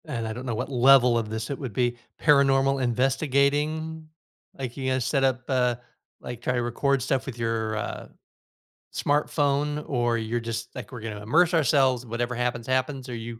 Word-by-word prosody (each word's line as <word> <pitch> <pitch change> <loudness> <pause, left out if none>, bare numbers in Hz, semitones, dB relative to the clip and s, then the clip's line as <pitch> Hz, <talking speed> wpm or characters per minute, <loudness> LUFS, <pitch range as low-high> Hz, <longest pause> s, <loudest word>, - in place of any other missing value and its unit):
And 120 -8 -3
I 110 - -3
don't 125 +3 -7
know 120 -3 -2
what 110 - -3
level 125 -1 +6
of 110 -2 -2
this 110 +1 -4
it 140 - -4
would 130 -6 -5
be 120 0 0 0.2
"paranormal 135 -2 +4
investigating?" 145 +5 0 0.5
Like 130 -3 -5
you're 135 -2 -4
gonna 130 0 +1
set 135 +3 +1
up, 130 -1 +2
uh, 125 -2 +2 0.4
like 120 -1 -8
try 125 - -1
to 125 - 0
record 135 +3 0
stuff 135 +1 -1
with 130 -3 -7
your, 115 -2 -1
uh, - - -5 0.9
smartphone 145 0 0
or 120 -3 +1
you're 115 +1 -2
just 115 0 -5
like, - - -8
"We're 125 -3 -8
gonna 110 -2 -6
immerse 160 - +3
ourselves, 135 -5 +3
whatever 120 +2 -2
happens, 120 -1 -2
happens," 130 +1 -1
or - - -7
are - - -3
you 115 0 -7
130 Hz, 190 wpm, -26 LUFS, 120-140 Hz, 0.9 s, level